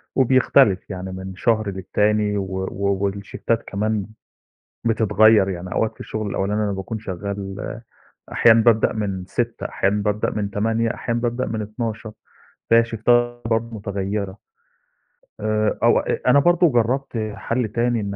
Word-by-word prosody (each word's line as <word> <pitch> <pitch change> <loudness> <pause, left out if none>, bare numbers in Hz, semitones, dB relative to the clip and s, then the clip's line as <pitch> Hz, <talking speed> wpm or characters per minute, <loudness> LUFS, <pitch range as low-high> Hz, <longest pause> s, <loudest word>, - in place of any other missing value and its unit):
وبيختلف 130 -6 +3
يعني 95 -1 -5
من 95 0 -7
شهر 110 +1 +1
للتاني 105 +2 0
و 100 - -1 0.3
و 100 0 0
والشفتات 100 +3 -2
كمان 105 0 -1 0.8
بتتغيّر، 110 -2 +4
يعني 90 0 -5
أوقات 110 - 0
في - - -29
الشُغل 110 -1 -4
الأولاني 105 +2 -1
أنا 105 - -1
باكون 95 +3 -4
شغاّل، 100 +2 -5 0.5
أحيانًا 115 -1 +5
بابدأ 115 -2 +4
من 100 -4 -3
06:00، 120 +3 -2
أحيانًا 100 +2 0
بابدأ 105 0 0
من 105 -2 -2
08:00، 115 +3 0
أحيانًا 120 -1 -3
بابدأ 120 +1 -1
من 110 -1 -3
12:00، 110 +1 -5 0.6
فهي 115 - +7
الشفتات 120 +1 +1
برضه 115 0 -1
مُتغيّرة. 100 -1 -3 1.0
آآ 110 0 0
أو - - +5
أ - - -2
أنا 140 - +6
برضه 175 +3 +4
جرّبت 120 -2 0
حَل 120 +1 -1
تاني 120 +2 0
إن 100 -1 -4
110 Hz, 140 wpm, -22 LUFS, 100-115 Hz, 1.0 s, فهي